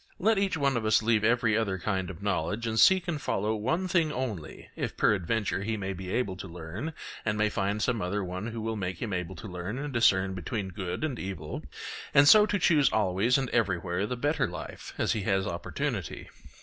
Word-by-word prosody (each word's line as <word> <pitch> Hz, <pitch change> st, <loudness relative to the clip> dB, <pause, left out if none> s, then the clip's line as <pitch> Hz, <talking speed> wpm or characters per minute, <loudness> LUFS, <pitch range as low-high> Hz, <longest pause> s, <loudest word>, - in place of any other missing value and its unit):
Let 215 Hz, +1 st, +3 dB
each 195 Hz, -4 st, +1 dB
one 140 Hz, -2 st, +2 dB
of 115 Hz, -, -2 dB
us 110 Hz, 0 st, +3 dB
leave 110 Hz, -1 st, +3 dB
every 115 Hz, -1 st, +3 dB
other 105 Hz, -4 st, 0 dB
kind 95 Hz, 0 st, -2 dB
of 95 Hz, +1 st, -9 dB
knowledge 100 Hz, +3 st, -1 dB
and 110 Hz, -1 st, 0 dB
seek 190 Hz, -1 st, +6 dB
and 155 Hz, -4 st, -2 dB
follow 105 Hz, +3 st, 0 dB
one 130 Hz, -, -1 dB
thing 170 Hz, -4 st, +2 dB
only, 115 Hz, -, -5 dB
if -, -, -4 dB
peradventure 105 Hz, +1 st, +1 dB
he 110 Hz, +2 st, -2 dB
may 95 Hz, -1 st, -3 dB
be 95 Hz, 0 st, -7 dB
able 115 Hz, -5 st, 0 dB
to 90 Hz, -, -7 dB
learn 90 Hz, -, -6 dB, 0.3 s
and 105 Hz, -1 st, 0 dB
may 105 Hz, 0 st, +2 dB
find 100 Hz, +2 st, -1 dB
some 125 Hz, -3 st, +1 dB
one 95 Hz, +1 st, -3 dB
who 115 Hz, -1 st, -5 dB
will 110 Hz, 0 st, -2 dB
make 95 Hz, -4 st, -3 dB
him 105 Hz, -4 st, -3 dB
able 90 Hz, 0 st, -3 dB
to 85 Hz, -, -8 dB
learn 90 Hz, +5 st, -5 dB
and 145 Hz, 0 st, -4 dB
discern 95 Hz, -5 st, +3 dB
between 95 Hz, +2 st, -3 dB
good 90 Hz, -, -4 dB
and 140 Hz, -6 st, -2 dB
evil, 80 Hz, -6 st, -5 dB, 0.5 s
and 140 Hz, +1 st, +7 dB
so 210 Hz, +5 st, +8 dB
to 205 Hz, -, +1 dB
choose 155 Hz, -6 st, +4 dB
always 105 Hz, +4 st, +2 dB
and 135 Hz, -2 st, -2 dB
everywhere 95 Hz, -3 st, 0 dB
the 125 Hz, -, -3 dB
better 145 Hz, 0 st, +1 dB
life 90 Hz, -2 st, -8 dB
as -, -, +1 dB
he 110 Hz, -, 0 dB
has 95 Hz, -1 st, +1 dB
opportunity. 85 Hz, -, -4 dB
105 Hz, 210 wpm, -29 LUFS, 95-125 Hz, 0.5 s, so